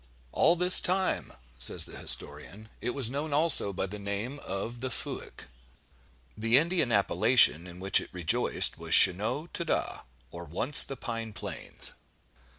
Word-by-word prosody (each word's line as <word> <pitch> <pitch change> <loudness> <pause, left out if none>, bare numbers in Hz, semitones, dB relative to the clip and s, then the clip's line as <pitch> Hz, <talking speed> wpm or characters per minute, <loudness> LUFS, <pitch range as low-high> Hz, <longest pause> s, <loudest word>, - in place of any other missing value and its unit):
"All 170 - +3
this 180 +1 +4
time," 185 +1 -2 0.3
says - - +1
the - - -12
historian, 95 +9 0
"it 120 +1 -4
was 130 -4 +2
known 145 +2 -4
also 150 -8 +2
by 95 - -4
the 105 +2 -9
name 100 +8 -6
of 115 +4 -7
'The 130 - -4
Fuyck.'" - - -7 0.9
The 115 +3 +2
Indian 165 -4 0
appellation 100 -3 +2
in 90 0 -12
which 95 +1 +3
it - - -11
rejoiced 90 -4 +1
was - - +1
Schaunaugh 110 - +3
ta 170 - -2
da, 165 - -3 0.3
or 85 0 -9
Once 115 - +3
the 135 - -6
pine 115 -2 -6
plains. - - -1
115 Hz, 155 wpm, -27 LUFS, 95-145 Hz, 0.9 s, this